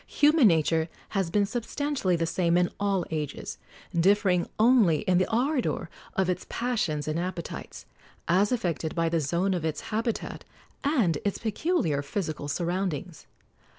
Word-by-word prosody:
Human 295 -4 +5
nature 160 -1 +2 0.2
has 195 -4 -1
been 205 +3 +2
substantially 240 -1 -1
the 165 0 0
same 170 +1 +1
in 175 0 +2
all 200 -3 +1
ages, 150 -3 -4 0.3
differing 180 0 +3
only 220 -8 +5
in 185 -4 +2
the 185 - +1
ardor 250 - 0 0.2
of 190 -1 +2
its 180 0 -2
passions 195 -12 -1
and 155 +2 -1
appetites, 175 - -5 0.4
as 190 +5 +3
affected 170 - -1
by 165 -1 +1
the 165 0 +1
zone 170 +6 0
of 175 -3 -2
its 155 -2 -2
habitat 225 +1 -2 0.4
and 230 - +2
its 200 - -1
peculiar 220 - 0
physical 155 -1 -4
surroundings. 175 0 -3
180 Hz, 145 wpm, -27 LUFS, 165-215 Hz, 0.4 s, Human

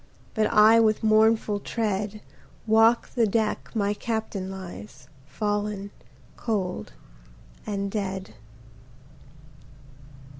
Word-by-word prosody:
But 220 -1 +2
I 215 +2 +7
with 215 -1 +2
mournful 220 -1 +3
tread, 210 -1 -2 0.4
Walk 225 +1 +4
the 235 -3 +2
deck 215 +1 -1
my 205 -1 +1
Captain 215 -3 -3
lies, 130 - -9 0.2
Fallen 205 0 -2 0.5
Cold 185 - -3 0.7
and 200 -1 -2
Dead. 190 - -4
210 Hz, 85 wpm, -25 LUFS, 195-220 Hz, 0.7 s, I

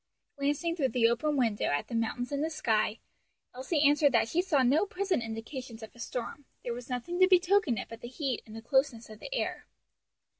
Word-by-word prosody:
Glancing 290 +4 0
through 290 -6 +1
the 230 -1 +3
open 285 +6 0
window 230 -5 +1
at 145 0 0
the - - -9
mountains 230 +2 -1
and 285 +1 -1
the 320 - 0
sky, 220 -7 0 0.6
Elsie 285 +4 +2
answered 290 0 +4
that 225 -1 +3
she 330 +9 +1
saw 315 -8 +2
no 270 +8 +4
present 390 - -1
indications 225 +1 -7
of 220 - -10
a - - -17
storm; 250 +3 -5 0.2
there 240 - -2
was 245 +1 -8
nothing 260 +9 -3
to 370 - +7
betoken 365 - +3
it - - -4
but 230 0 -10
the - - -6
heat 260 -1 -3
and 220 +1 -9
closeness 265 -5 +1
of 215 - -11
the - - -9
air. - - -3
260 Hz, 210 wpm, -30 LUFS, 230-305 Hz, 0.6 s, to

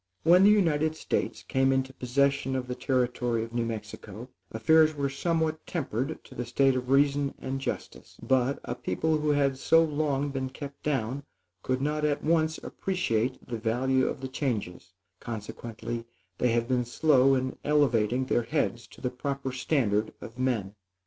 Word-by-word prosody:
When 175 +3 +6
the 205 - +8
United 160 -7 +3
States - - -2
came 135 -1 +2
into 130 0 0
possession 135 +1 +1
of 130 -1 -2
the 125 - -3
territory 125 -3 0
of 115 +1 -8
New 120 0 0
Mexico, 110 +1 -7 0.2
affairs 155 +7 +4
were 140 -1 -1
somewhat 160 +2 -1
tempered 140 -3 -3
to - - -14
the 120 - -3
state 135 +3 +2
of 125 0 -3
reason 140 0 +3
and 135 +1 -4
justice; - - -6
but, 130 +1 +1
a - - -3
people 155 +5 -1
who 150 0 0
had 140 -2 +2
so 165 +3 +5
long 145 -2 0
been 135 -1 -3
kept 140 +1 -9
down, 135 -2 -1 0.4
could 130 +4 -1
not 150 +1 -1
at 150 -1 0
once 160 0 +2
appreciate 130 - -2
the 115 -2 -4
value 130 +4 +1
of - - -4
the 135 - -3
changes; 105 - -3 0.3
consequently, 115 +1 -6 0.3
they 125 - +3
have 115 0 +1
been 125 -1 +1
slow 135 +1 +4
in 130 0 -2
elevating 130 -4 +2
their 120 - +1
heads 120 -3 -1
to - - -16
the 125 - -1
proper 135 +1 -3
standard 120 -6 0
of 115 +3 -10
men. 115 -7 0
130 Hz, 170 wpm, -28 LUFS, 120-145 Hz, 0.4 s, the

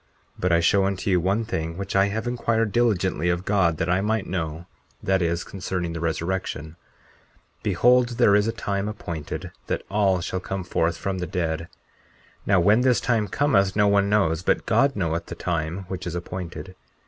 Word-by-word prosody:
But 90 - -1
I 85 0 +4
show 95 +3 +3
unto 100 0 -1
you 90 - +4
one 100 +6 0
thing 80 -6 -3
which 100 0 -4
I 100 0 +5
have 110 +2 -3
inquired 115 -3 0
diligently 95 -8 +1
of 90 +2 -1
God 90 -6 +2
that 85 - -1
I 90 +2 +2
might 110 0 0
know—that 85 +2 -3
is 85 0 0
concerning 90 -3 -4
the 80 - -4
resurrection. 85 -1 -3 0.8
40:4 - - -38
Behold, 120 +5 +3
there 100 - +5
is 105 +1 +3
a - - +1
time 100 -3 -2
appointed 85 -8 -5 0.2
that - - -2
all 100 -3 +2
shall 95 +2 -3
come 95 +1 -4
forth 85 -1 0
from 95 -1 -3
the 90 - -3
dead. 85 -2 -2 0.8
Now 95 -2 +4
when 105 +7 +4
this 125 -1 +3
time 115 -4 +1
cometh 100 -5 +2
no 105 -1 +4
one 100 0 +3
knows; 85 -6 +2
but - - +1
God 140 0 +3
knoweth 85 -3 -2
the - - -6
time 85 +2 -3
which 90 -1 -5
is 85 - -4
appointed. 90 +1 -6
95 Hz, 185 wpm, -24 LUFS, 85-105 Hz, 0.8 s, I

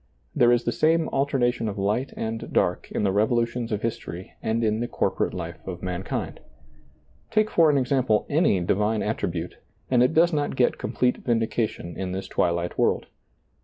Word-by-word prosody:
There 120 -1 +5
is 120 0 +3
the 120 - 0
same 160 +4 +2
alternation 125 -4 0
of 100 - -6
light 105 +7 0
and 110 0 -4
dark - - 0
in - - -1
the 100 - +2
revolutions 115 +3 0
of 105 -1 -2
history 110 -6 -5
and 115 +1 0
in 110 0 +1
the 120 - -1
corporate - - -1
life 85 -2 -6
of 90 -1 -6
mankind. 90 0 -4 0.9
Take 215 -1 +2
for 165 -2 +5
an 145 - +3
ex 130 -1 -1
ample 125 -6 +2
any 150 - +3
divine 105 +5 +1
attribute, 90 -5 -3 0.3
and 125 -2 +4
it 125 +5 +3
does 170 +2 +4
not 145 -2 -1
get 125 -2 +2
complete 125 -1 0
vindication 115 -7 -1
in 95 -1 -4
this 95 0 -4
twilight 85 0 -1
world. - - +2
115 Hz, 175 wpm, -25 LUFS, 95-125 Hz, 0.9 s, There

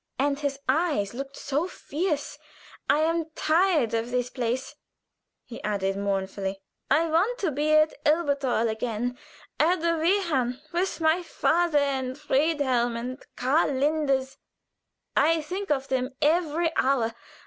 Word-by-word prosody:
and 280 +1 +1
his 285 -2 -2
eyes 275 - +1
looked 275 +2 -6
so 290 +5 -1
fierce. 310 -3 -3 0.5
I'm 325 +2 +2
tired 320 - +2
of 230 +1 -1
this 250 0 -1
place," 255 +3 -2 0.7
he 235 - -9
added, 195 -2 -1
mournfully. 195 -1 -2 0.3
"I 305 +4 +4
want 365 +10 +2
to 385 -9 -1
be 295 +2 0
at 310 0 +5
Elberthal 280 -7 +2
again 230 +2 -2 0.4
at 345 +4 +3
the 335 0 +2
Wehrhahn, 315 -9 +1
with 355 +2 -1
my 320 +3 +3
father 340 -1 +1
and 265 -2 0
Friedhelm 270 -5 +1
and 250 +3 -6
Karl 280 +3 +2
Linders. 270 -1 0 0.8
I 325 +3 +4
think 380 +5 -5
of 275 -2 0
them 255 -1 0
every 325 +1 +1
hour. 245 -4 +2
285 Hz, 130 wpm, -26 LUFS, 250-325 Hz, 0.8 s, at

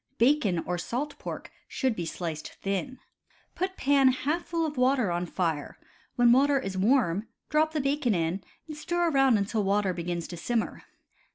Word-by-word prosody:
Bacon 235 - +3
or 180 0 -2
salt 280 - -4
pork - - -7 0.2
should 260 -4 -1
be 170 -4 -3
sliced 160 -3 -5
thin. 200 +7 -3 0.6
Put 375 +1 -3
pan 275 -1 +4
half 290 +6 0
full 335 -1 0
of 300 -1 -4
water 255 -5 +2
on 175 +1 -1
fire; 165 -5 -2 0.4
when 245 -2 +5
water 275 +3 +4
is 195 -7 -5
warm, 205 -1 +2 0.2
drop 310 +1 +2
the 305 - 0
bacon 275 -5 +1
in, 170 +3 -1 0.2
and 305 - -7
stir 345 +2 0
around 270 -5 +4
until 205 +1 0
water 200 -1 +1
begins 175 -1 -3
to 175 - -7
simmer. 230 +6 -2
240 Hz, 170 wpm, -28 LUFS, 185-285 Hz, 0.6 s, when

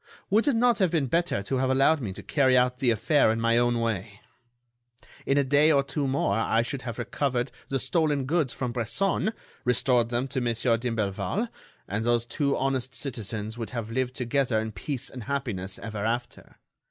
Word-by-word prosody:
Would 220 +7 +3
it 280 - +3
not 240 -1 +3
have 190 -3 +3
been 155 -4 +1
better 165 - 0
to 130 +6 -1
have 130 0 +1
allowed 135 +3 +3
me 105 -6 -3
to - - -9
carry 130 -3 +3
out 125 0 +2
the 130 -3 +2
affair 115 +3 +3
in 110 - -1
my 115 +1 +3
own 120 -1 +2
way? 105 -2 -3 1.1
In 135 - +3
a 140 - +4
day 145 +4 +4
or 140 -2 +4
two 140 +1 -2
more, 130 -6 +1
I 115 0 +2
should 135 +2 -4
have 115 -4 -6
recovered 130 -3 -1 0.2
the 135 - 0
stolen 145 +1 +1
goods 150 -2 +1
from 125 -2 -3
Bresson, 180 - 0 0.3
restored 125 -1 +2
them 120 +2 -1
to 130 -1 -2
Monsieur 120 0 +1
d'Imblevalle, 115 - -2 0.4
and 105 +3 -2
those 120 0 +2
two 140 +4 0
honest 130 -1 -1
citizens 110 -3 -4
would 115 - -4
have 115 -3 -5
lived 130 +1 -1
together 125 -2 +1
in 110 0 -3
peace 125 +6 -3
and 125 -4 -8
happiness 115 -9 -3
ever 110 -3 -5
after. 120 +2 -3
125 Hz, 190 wpm, -27 LUFS, 115-140 Hz, 1.1 s, a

